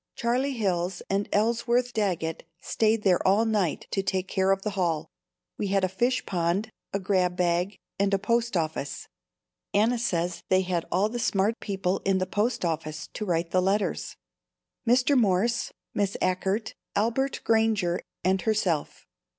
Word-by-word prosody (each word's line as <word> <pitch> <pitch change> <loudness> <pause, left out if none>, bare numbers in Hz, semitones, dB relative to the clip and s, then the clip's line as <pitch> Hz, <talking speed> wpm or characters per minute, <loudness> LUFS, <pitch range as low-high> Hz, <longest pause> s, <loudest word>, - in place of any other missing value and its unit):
Charlie 255 +4 0
Hills 185 -5 -1
and 200 +1 0
Ellsworth 235 +3 +1
Daggett 180 -7 -1 0.2
stayed 220 +2 +1
there 185 -3 +4
all 205 +4 +4
night 210 -7 0
to 195 - +1
take 190 -1 -1
care 190 0 +1
of 195 0 +2
the 210 - -1
hall. 165 -5 -1 0.5
We 205 - 0
had 195 0 +1
a - - +4
fish 240 +7 0
pond, 180 +4 0 0.2
a 200 - -1
grab 185 -2 +1
bag 180 +2 +1 0.2
and 200 0 +2
a 195 - +3
post 235 +1 0
office. 155 -4 -3 0.7
Anna 230 +4 +3
says 175 -6 -1
they 185 0 +4
had 180 -2 -2
all 190 +4 +3
the 240 +2 -4
smart 220 -1 +1
people 195 -2 -1
in 195 -1 +2
the 185 - 0
post 205 +2 0
office 155 -2 -3
to 215 - -4
write 170 -2 0
the 185 - +3
letters, 200 +3 0 0.7
Mr. 250 +4 +4
Morse, 230 +1 +2 0.2
Miss 200 -1 0
Achert, 195 +4 0 0.2
Albert 235 +6 0
Granger 220 -6 +2 0.2
and 190 +1 +2
herself. 190 -8 -1
195 Hz, 160 wpm, -27 LUFS, 180-220 Hz, 0.7 s, there